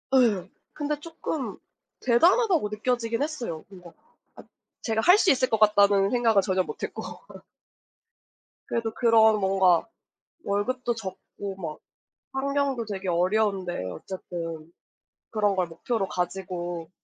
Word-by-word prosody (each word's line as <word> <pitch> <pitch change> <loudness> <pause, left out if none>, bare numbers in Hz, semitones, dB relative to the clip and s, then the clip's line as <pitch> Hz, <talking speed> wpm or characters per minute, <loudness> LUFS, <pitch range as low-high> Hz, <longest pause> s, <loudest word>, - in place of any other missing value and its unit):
예. 205 -8 +3 0.2
근데 295 0 -2
쪼끔 320 -3 -5 0.4
대단하다고 335 - +4
느껴지긴 230 +3 -1
했어요. 245 - -4
뭔가 180 -3 -13 0.4
'아 - - -12 0.4
제가 220 -2 -1
할 360 - +7
수 375 -5 +4
있을 255 -1 +2
것 220 - +1
같다.'는 200 -2 +5
생각은 230 -4 +3
전혀 185 -1 +1
못 - - -8
했고 - - -4 1.7
그래도 230 -1 -1
그런 220 -2 +5
뭔가 190 -3 +3 0.6
월급도 240 +5 -1
적고 195 -2 -7
막 160 -4 -6 0.5
환경도 275 -2 0
되게 195 -3 -4
어려운데 185 - +1
어쨌든 165 - -7 0.6
그런 205 -2 +1
걸 185 -2 0
목표로 195 +5 -2
가지고 175 -2 -4
210 Hz, 255 characters per minute, -26 LUFS, 185-245 Hz, 1.7 s, 할